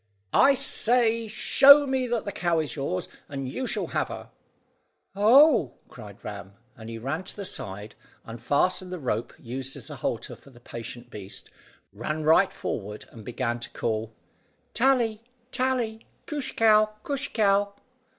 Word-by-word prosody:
"I 275 0 +6
say, 230 -3 +2
show 280 +6 +7
me 265 -2 0
that 235 -2 -2
the 200 - -3
cow 175 -3 0
is 155 -2 -2
yours, 135 -10 -3 0.2
and 135 -2 -4
you 255 - -4
shall - - -1
have - - -1
her." - - -9 0.8
"Oh," 225 - +5
cried 105 -4 -12
Ram, 100 -2 -7 0.2
and 110 -1 -10
he 115 - -6
ran 135 +10 -3
to - - -6
the 200 - -6
side, 105 - -5 0.3
unfastened 145 +11 0
the 180 - -4
rope 120 -6 -2
used 130 +3 -6
as - - -10
a 145 - -7
halter 115 -1 -3
for - - -19
the 120 -3 -17
patient 120 0 -9
beast, 100 -2 -8 0.4
ran 155 +9 -3
right 160 +5 +5
forward, 105 0 -5
and 110 - -12
began 120 +1 -3
to 120 - -8
call, 110 -1 -3 0.6
"Tally, 235 -3 +2 0.3
Tally! 250 -4 -1 0.2
Coosh 295 -4 -4
cow, 215 -1 +4
coosh 285 0 -3
cow!" 200 -1 +1
165 Hz, 155 wpm, -26 LUFS, -, 0.8 s, show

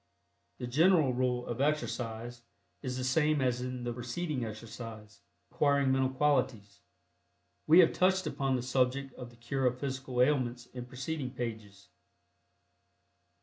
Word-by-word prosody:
The - - -5
general 155 +1 +4
rule 125 0 0
of 120 +2 -3
exercise 120 -5 -2 0.4
is 130 -2 -4
the 130 - -3
same 150 +3 +2
as 125 -2 +1
in 125 -1 -4
the 120 0 -2
preceding 125 +4 -3
exercise 110 -1 -8 0.3
(acquiring 140 -2 +2
Mental 130 0 +2
Qualities). 130 -7 0 0.9
We 165 +4 +9
have 165 - +4
touched 185 0 +2
upon 135 -3 0
the 125 - -2
subject 130 +1 0
of 125 -2 -9
the 120 - -18
cure 130 +3 -1
of 125 0 -1
physical 130 -2 -4
ailments 125 -3 +2
in 125 -1 -7
preceding 135 +2 -4
pages. 110 -8 -7
125 Hz, 140 wpm, -31 LUFS, 120-140 Hz, 0.9 s, We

